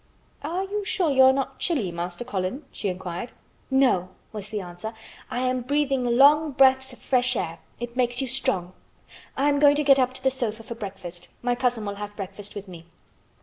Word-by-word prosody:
"Are 340 +6 -2
you 410 +2 -3
sure 390 -6 +1
you 265 -1 +5
are 260 0 +8
not 270 0 -2
chilly, 265 - 0
Master 175 +6 -5
Colin?" 205 +5 -3
she - - -4
inquired. 185 +3 -4 0.4
"No," 255 -10 +3 0.2
was 210 -1 -6
the 215 -1 -3
answer. 180 +4 -7 0.3
"I 245 - -2
am 255 0 0
breathing 275 0 +1
long 285 +5 +5
breaths 265 0 +4
of 250 - -13
fresh 255 -1 +1
air. 165 -5 -3 0.2
It 240 0 -6
makes 245 -1 +1
you 270 - -1
strong. 195 -9 -1 0.6
I 275 +2 +2
am 285 -1 +3
going 290 0 +6
to 300 - +1
get 275 -1 +6
up 255 0 +1
to 260 - -9
the 265 - +3
sofa 230 -4 -3
for 235 - -6
breakfast. 185 -5 -7 0.2
My 245 0 +2
cousin 245 -3 0
will 200 0 -4
have 205 0 -6
breakfast 200 +1 -7
with 205 -1 -7
me." 170 -2 -11
245 Hz, 200 wpm, -25 LUFS, 200-270 Hz, 0.6 s, are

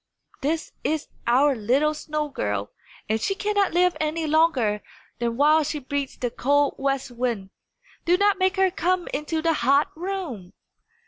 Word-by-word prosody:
This 310 +4 -1
is 310 -1 -1 0.2
our 270 +4 +4
little 260 +8 +2
snow 305 0 -3
girl, 105 - -3 0.4
and 220 +1 0
she 390 - 0
cannot 410 -1 +1
live 360 0 +3
any 315 +1 -1
longer 285 -10 +2 0.4
than 235 -1 -1
while 305 +3 +5
she 300 - -3
breathes 280 0 -4
the 245 -2 -2
cold 285 +3 +2
west 275 -1 -1
wind. 235 -6 -3 0.5
Do 350 +1 +4
not 400 0 +3
make 375 +1 +2
her 380 -1 +3
come 360 0 0
into 315 +2 -2
the 330 -1 +3
hot 280 +1 +2
room!" 330 - -5
295 Hz, 155 wpm, -24 LUFS, 250-335 Hz, 0.5 s, while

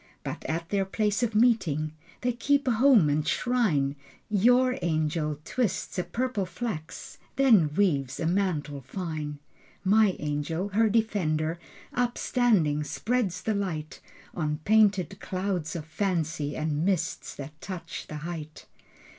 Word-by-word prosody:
But - - -5
at 165 +1 -3
their 200 -1 +1
place 205 +3 0
of 230 -3 0
meeting 190 -10 +3 0.3
They 250 - +1
keep 280 +4 +1
a - - +4
home 230 - +5
and 150 +1 0
shrine. 170 - +1 0.4
Your 245 +5 +4
angel 155 -2 0
twists 240 -6 -1
a - - +1
purple 235 -5 -2
flax, 180 -4 -6 0.2
Then 220 - +5
weaves 140 -10 +1
a - - -1
mantle 160 -6 0
fine. 150 0 -5 0.5
My 205 0 +4
angel, 150 +5 -2
her 220 +3 +3
defender 175 -7 0 0.3
Upstanding, 235 - +2
spreads 200 0 -1
the 220 - +1
light 165 -7 -3 0.3
On 150 -2 -1
painted 200 -4 +3
clouds 185 -4 -2
of 160 -3 -4
fancy 160 -4 -1
And 155 0 -1
mists 180 -3 -1
that 150 +3 -9
touch 185 -2 -6
the 155 - -7
height. 155 -3 -7
180 Hz, 130 wpm, -27 LUFS, 155-220 Hz, 0.5 s, home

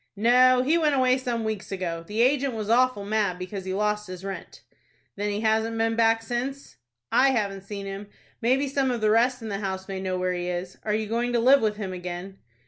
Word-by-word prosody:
"No, 250 +4 +5
he 315 +6 +3
went 300 -3 +2
away 255 0 +3
some 240 -3 -2
weeks 215 -3 -4
ago. 170 -3 -3
The 220 +3 +1
agent 270 -1 +2
was 215 0 -2
awful 250 -4 +3
mad 205 -3 0
because 185 +1 -6
he 185 - -3
lost 210 0 -1
his 185 +1 -8
rent." 195 -1 -7 0.5
"Then 205 +1 -2
he 205 +1 -2
hasn't 220 +1 +1
been 225 0 +1
back 225 0 +3
since?" 250 - -4 0.3
"I 270 - +5
haven't 200 -6 -1
seen 200 -1 -6
him. 195 +1 -6 0.3
Maybe 260 +4 +2
some 275 -1 0
of 240 -2 -2
the 215 0 +3
rest 245 +2 +2
in 220 - -5
the 200 -1 -3
house 190 -2 -4
may 190 -1 -4
know 185 -1 -2
where 185 0 0
he 175 0 -3
is. 180 +1 -4
Are 210 -1 -1
you 220 0 -1
going 235 +3 -1
to 240 - +3
live 265 +3 +6
with 215 -1 +1
him 195 -3 -4
again?" 180 +2 -7
220 Hz, 225 wpm, -25 LUFS, 195-245 Hz, 0.5 s, live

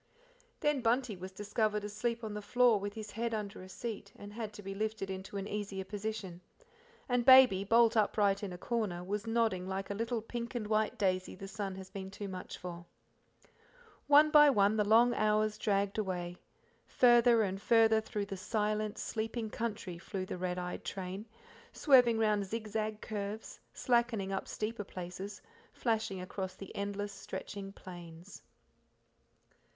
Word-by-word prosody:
Then 295 -3 +2
Bunty 240 -1 +1
was 185 +1 -8
discovered 210 +1 -1
asleep 230 +3 -2
on 215 -1 -4
the 210 - -4
floor 240 +1 +4
with 205 +1 -5
his 215 -1 -7
head 230 +1 -2
under 205 -3 -5
a 185 - -11
seat, 205 -1 -6
and 205 0 -10
had 220 -1 -5
to 205 - -10
be 195 +1 -5
lifted 215 -1 -3
into 190 +1 -6
an 195 0 -4
easier 205 -2 -4
position; 200 -2 -5 0.7
and 245 -1 +1
Baby, 255 -7 +8
bolt 230 +2 +4
upright 205 -2 +2
in 200 -3 -4
a 180 - -6
corner, 200 -5 -2
was 205 +4 -3
nodding 225 -5 +1
like 195 +1 -3
a - - 0
little 230 +2 -2
pink 235 +1 -5
and 230 -3 -2
white 215 0 +1
daisy 185 -2 0
the 195 +1 -8
sun 195 -1 -4
has 190 0 -10
been 190 -1 -6
too 200 +1 -6
much 185 -1 -7
for. 175 -1 -7 1.2
One 295 +1 +7
by 295 -1 +8
one 205 -4 +4
the 210 - +3
long 230 +4 +5
hours 215 -1 +1
dragged 200 0 0
away; 180 -3 -3 0.5
farther 240 -2 +5
and 195 -1 -3
farther 225 -1 +5
through 210 -1 -3
the 195 -1 -6
silent, 210 +1 -1
sleeping 220 0 -3
country 205 -6 -4
flew 185 +1 -4
the 185 - -6
red 180 0 -2
eyed 180 0 -4
train, 190 +3 -5 0.5
swerving 250 -6 +5
round 210 -2 +2
zigzag 215 0 -3
curves, 210 +1 -5
slackening 235 -5 +1
up 195 - -3
steeper 215 0 -3
places, 190 +2 -7 0.3
flashing 220 -5 -1
across 185 0 -5
the 195 - -10
endless 200 0 -3
stretching 195 +1 -7
plains. 175 -1 -11
210 Hz, 165 wpm, -33 LUFS, 195-225 Hz, 1.2 s, Baby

